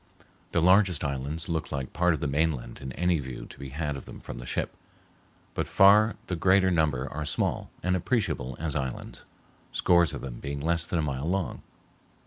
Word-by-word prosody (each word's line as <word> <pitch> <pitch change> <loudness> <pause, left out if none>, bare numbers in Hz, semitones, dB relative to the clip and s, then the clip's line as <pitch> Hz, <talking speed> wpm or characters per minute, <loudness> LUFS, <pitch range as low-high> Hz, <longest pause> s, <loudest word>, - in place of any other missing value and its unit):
The 85 - +2
largest 95 -2 +4
islands 70 +3 -2
look 80 -2 -2
like 70 -1 -4
part 90 0 +3
of - - -8
the 75 - 0
mainland 75 -2 -1
in 65 -1 -5
any 90 -1 +1
view 65 -3 -6
to - - -14
be 70 -1 -7
had 75 +1 -3
of 70 - -8
them - - -10
from - - -8
the - - -8
ship, - - -2 0.8
but - - -2
far 105 +3 +6
the 90 - -2
greater 95 +2 +4
number 75 -6 +1
are 75 +1 -3
small, 75 - -1
and 90 0 +2
appreciable 90 - -1
as 80 -1 -1
islands, 65 -3 -4 0.5
scores 85 -3 +3
of - - -6
them 60 -3 -6
being 70 0 -4
less 85 +3 +1
than 85 - -1
a 80 - +1
mile 70 +1 -2
long. 95 -1 -1
80 Hz, 195 wpm, -28 LUFS, 70-90 Hz, 0.8 s, far